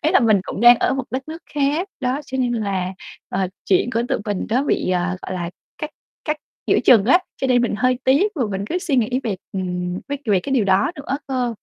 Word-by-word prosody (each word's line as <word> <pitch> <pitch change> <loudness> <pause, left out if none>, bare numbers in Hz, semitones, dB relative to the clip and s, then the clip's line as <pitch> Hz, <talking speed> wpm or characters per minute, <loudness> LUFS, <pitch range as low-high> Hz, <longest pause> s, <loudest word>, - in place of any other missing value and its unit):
Ý 310 - +3
là 370 - +5
mình 215 -4 +4
cũng - - -5
đang 240 +1 +9
ở 255 - +1
một 270 -1 -2
đất 260 +5 -4
nước 325 +2 -7
khác, 295 +6 +1
đó, 255 +2 0
cho 265 - -4
nên 250 -2 +1
là, 195 -5 -1 0.4
ờ, 190 0 -1 0.2
chuyện 195 +5 +2
của 230 - +1
tụi - - +1
mình 205 -3 -2
nó 245 +5 +2
bị, 185 - 0
ờ, 180 0 0
gọi 190 - -5
là, 175 -1 -3 0.3
cắt 305 - -4 0.3
cắt 305 0 0 0.3
giữa - - +4
chừng 225 -6 +7
á, 305 +11 +6 0.2
cho 270 - -1
nên 250 -2 +3
mình 240 - 0
hơi 255 +2 +2
tiếc 315 +11 +3
và 275 - -1
mình 195 0 -3
cứ 350 +10 -1
suy 335 -6 -1
nghĩ 250 +2 +1
về, 210 -5 -1 0.2
ừm, 180 -1 -3
vế 285 - -1
về 200 -4 +3
cái 270 - -4
điều 250 -6 +3
đó 195 - +3
nữa 280 -1 -3
cơ. 255 -3 -1
245 Hz, 250 wpm, -21 LUFS, 195-275 Hz, 0.4 s, đang